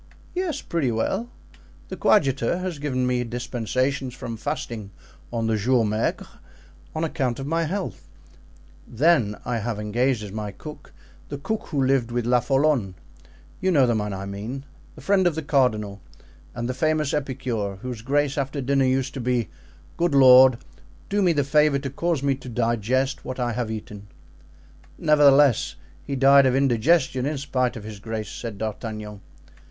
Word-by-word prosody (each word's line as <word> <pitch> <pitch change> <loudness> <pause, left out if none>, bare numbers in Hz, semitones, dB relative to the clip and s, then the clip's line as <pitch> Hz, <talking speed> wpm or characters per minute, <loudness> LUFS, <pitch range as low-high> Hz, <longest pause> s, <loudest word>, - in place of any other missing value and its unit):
"Yes, 365 -3 -2
pretty 155 -8 -1
well. 190 - -1 0.6
The - - -5
coadjutor 135 - +2
has 180 -4 -4
given 130 -3 -1
me 125 -1 0
dispensations 125 +2 -2
from 115 - -6
fasting 115 -5 -5 0.4
on 115 -1 -1
the 110 0 +1
jours 115 +1 +2
maigres, 110 +2 -1 0.7
on 160 - -1
account 140 -7 -1
of 135 - -5
my 165 +3 0
health; 190 +4 -4 0.8
then 120 -5 +2
I 120 -1 -1
have 115 0 -3
engaged 115 +3 0
as 105 - -7
my 105 0 -4
cook 150 +6 -11 0.4
the 145 - -4
cook 215 +10 -4
who 140 -3 0
lived 130 -3 +2
with 120 -1 -2
Lafollone—you 120 - -1
know 145 -7 +5
the 120 - +2
man 105 -2 -2
I 95 0 -5
mean?—the 120 +8 -8
friend 195 -2 +3
of 170 - 0
the 160 - -3
cardinal, 110 -9 +1 0.5
and 120 -1 -3
the 130 - -2
famous 155 +2 0
epicure 130 -8 -2
whose 120 +2 -7
grace 145 +3 0
after 135 +1 -3
dinner 135 0 +2
used 130 +1 0
to 135 - -5
be, 120 -5 0 0.5
'Good 170 -4 +1
Lord, 130 -2 +8 0.5
do 205 +1 +1
me 180 -3 +4
the 145 -3 +1
favor 150 +1 +3
to 135 -1 -5
cause 165 0 -1
me 140 -1 +2
to 130 -1 -8
digest 120 +4 0
what 130 0 -6
I 120 -1 0
have 120 -1 -2
eaten.'" 105 -2 -7 0.9
"Nevertheless 145 -4 +4 0.3
he 140 - -4
died 135 +1 +6
of 130 - +2
indigestion, 135 +1 +2
in 150 0 -2
spite 130 -2 -1
of 110 - -7
his 105 -1 -8
grace," 110 0 -5
said 115 -4 -6
D'Artagnan. 110 -1 -5
130 Hz, 160 wpm, -24 LUFS, 115-145 Hz, 0.9 s, Lord